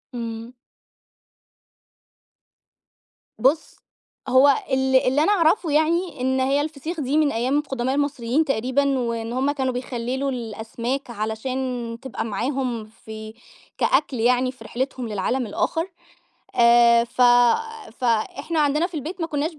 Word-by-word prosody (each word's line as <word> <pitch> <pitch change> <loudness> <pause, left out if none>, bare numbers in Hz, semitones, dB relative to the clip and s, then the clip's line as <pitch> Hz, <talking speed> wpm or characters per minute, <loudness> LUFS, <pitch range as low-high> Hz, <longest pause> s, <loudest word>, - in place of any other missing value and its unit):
إمم. 230 0 -6 2.8
بُص، 275 +7 +1 0.5
هو 265 +2 +6 0.2
ال 265 0 +2
اللي 260 +3 +3
أنا 400 - +3
أعرفه 335 -3 +2
يعني 315 -1 +1
إن 260 +1 +1
هي 270 +2 +2
الفسيخ 310 +3 -5
دي 285 +1 0
من 300 -2 +3
أيام 250 +5 0
القدماء 270 -3 -1
المصريين 285 0 0
تقريبًا، 270 +1 +1
وإن 230 -1 -3
هُم 265 +3 +1
كانوا 265 -3 -1
بيخللوا 250 +2 -3
الأسماك 235 +3 -4
علشان 235 +2 -3
تبقى 265 -4 -5
معاهم 245 0 -2
في 220 0 -10 0.4
كأكل 265 -2 +1
يعني 250 +2 +2
في 255 -3 -15
رحلتهم 255 +1 -3
للعالم 220 +5 -1
الآخر. 325 - -1 0.7
آآ، 235 -1 +6
ف 240 - -8 0.8
فإحنا 260 +6 0
عندنا 300 +3 +2
في 360 - -14
البيت 320 +5 -5
ما 330 - 0
كنّاش 310 +1 -2
ب - - -19
260 Hz, 125 wpm, -23 LUFS, 235-285 Hz, 2.8 s, هو